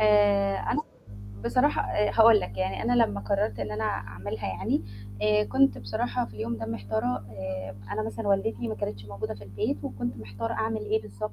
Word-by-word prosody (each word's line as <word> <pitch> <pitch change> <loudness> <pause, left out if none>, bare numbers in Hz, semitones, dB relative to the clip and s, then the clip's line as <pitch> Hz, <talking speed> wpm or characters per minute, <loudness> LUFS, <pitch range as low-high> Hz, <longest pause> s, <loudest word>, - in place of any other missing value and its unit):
آآ 205 -2 +5
أنا 295 - 0 0.6
بصراحة 265 +4 +3
آآ 210 0 +1
هاقول 225 -2 +8
لك 100 -1 -6
يعني 95 +1 -1
أنا 245 0 +4
لمّا 100 -1 -3
قررت 100 +1 0
إن 110 -2 -3
أنا 105 +1 -2
أعملها 100 +1 -3
يعني، 95 +1 0 0.4
آآ 210 0 +4
كنت 270 +3 +3
بصراحة 240 +2 -1
في - - -13
اليوم 115 +2 -2
ده 110 0 -5
محتارة 110 +1 -2
آآ 95 -1 -5 0.2
أنا 215 - 0
مثلًا 220 -1 -3
والدتي 120 - +1
ما 110 - -2
كانتش 100 -1 -4
موجودة 100 +1 -4
في 105 0 -11
البيت، 100 0 -2
وكنت 120 +3 -3
محتارة 110 - -4
أعمل 220 -1 0
إيه 215 +1 0
بالضبط 105 +1 -5
110 Hz, 185 wpm, -28 LUFS, -, 0.6 s, هاقول